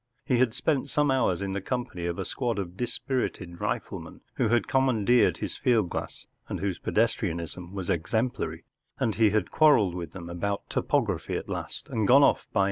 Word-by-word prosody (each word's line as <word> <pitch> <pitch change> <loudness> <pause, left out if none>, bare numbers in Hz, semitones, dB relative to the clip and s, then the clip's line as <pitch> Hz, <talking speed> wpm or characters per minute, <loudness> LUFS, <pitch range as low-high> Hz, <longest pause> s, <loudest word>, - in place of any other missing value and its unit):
He 125 -2 +2
had 125 -2 +2
spent 140 -1 0
some 145 -1 +2
hours 100 -9 +1
in 100 - -2
the 100 0 -2
company 120 -7 -3
of 85 0 -2
a 95 - -3
squad 120 -4 -2
of 90 -3 -4
dispirited 115 -6 -3
rifle¬ - - -2
men, - - -12 0.2
who - - +2
had 115 -2 +2
commandeered 125 -3 +3
his - - -4
field 110 -8 +2
glass - - -5 0.2
and - - -3
whose 95 -2 -2
pedestrianism 90 -6 -1
was 95 -3 -5
exemplary, 110 +9 -1 0.3
and 110 - 0
he 110 0 +4
had 105 -2 0
quarrelled 135 - +5
with 85 -3 -6
them 85 -3 -8
about 100 +4 -3
topography - - 0
at - - -6
last, - - -5
and 110 -3 0
gone 140 +3 +7
off 140 - +3
by 110 - 0
110 Hz, 190 wpm, -27 LUFS, 90-125 Hz, 0.3 s, gone